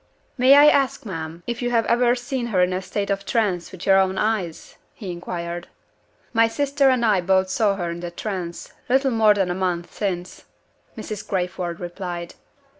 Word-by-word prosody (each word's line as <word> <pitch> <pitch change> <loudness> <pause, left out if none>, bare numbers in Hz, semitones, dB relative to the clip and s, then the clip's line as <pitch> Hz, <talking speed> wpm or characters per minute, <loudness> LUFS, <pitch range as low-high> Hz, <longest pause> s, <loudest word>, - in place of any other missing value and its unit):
"May 260 +2 +6
I 290 +1 +8
ask, 275 -5 +3
ma'am, 165 -3 -6
if 240 0 -4
you 245 - 0
have 230 -2 +2
ever 240 +1 +3
seen 245 0 -3
her 185 -6 +2
in 180 0 +1
a 185 - -2
state 200 +1 -3
of 195 0 -1
trance 200 -7 -1
with 185 -1 -9
your 195 0 +5
own 190 0 +1
eyes?" 200 -7 -2 0.2
he 195 -6 -6
inquired. 175 0 -5 0.7
"My 230 -1 +5
sister 280 +3 +2
and 250 -2 +2
I 205 -4 +3
both 190 +1 +2
saw 205 0 +2
her 175 -3 -3
in 170 - -6
the 175 0 -5
trance, 175 -2 -6 0.2
little 265 +1 +3
more 220 -2 +4
than 190 -3 0
a - - 0
month 180 -2 -2
since," 185 -3 -4 0.5
Mrs. 215 -2 -6
Crayford 180 -2 -2
replied. 175 -1 -6
195 Hz, 190 wpm, -23 LUFS, 175-235 Hz, 0.7 s, I